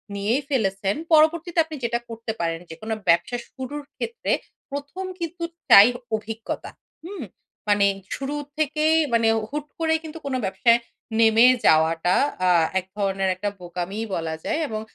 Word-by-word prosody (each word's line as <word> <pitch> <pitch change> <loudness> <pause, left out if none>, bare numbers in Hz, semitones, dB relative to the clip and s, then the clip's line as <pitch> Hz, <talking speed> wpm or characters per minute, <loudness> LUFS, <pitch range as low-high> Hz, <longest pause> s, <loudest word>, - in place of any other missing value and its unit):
নিয়েই 215 +7 0
ফেলেছেন, 195 -6 0 0.2
পরবর্তীতে 330 +2 +4
আপনি 315 -1 -8
যেটা 235 0 0
করতে 230 0 -5
পারেন, 165 -1 -1
যেকোনো 215 +7 -5 0.2
ব্যবসা 170 +8 +3
শুরুর 290 +3 -6
ক্ষেত্রে 465 0 -3 0.4
১ম 285 +7 -5
কিন্তু 335 0 -5 0.3
চাই 200 +2 +10 0.3
অভিজ্ঞতা। 220 +1 -5 0.4
হুম? 370 -4 -6 0.5
মানে 205 -1 +4 0.3
শুরু 275 +2 -4 0.2
থেকেই 310 +1 +2 0.2
মানে 230 -1 +3 0.2
হুট 295 0 -4
করে 320 -1 +2
কিন্তু 320 0 -8
কোনো 270 -2 -1
ব্যবসায় 230 +5 +3 0.4
নেমে 225 +1 +6 0.2
যাওয়াটা 165 +3 +4 0.3
আ - - +4 0.3
এক 185 - -10
ধরনের 195 -1 0
একটা 205 +3 -2
বোকামিই 180 +5 -4
বলা 165 -1 -3
যায়। 320 0 0
এবং 215 -3 -4
230 Hz, 140 wpm, -24 LUFS, 195-300 Hz, 0.5 s, চাই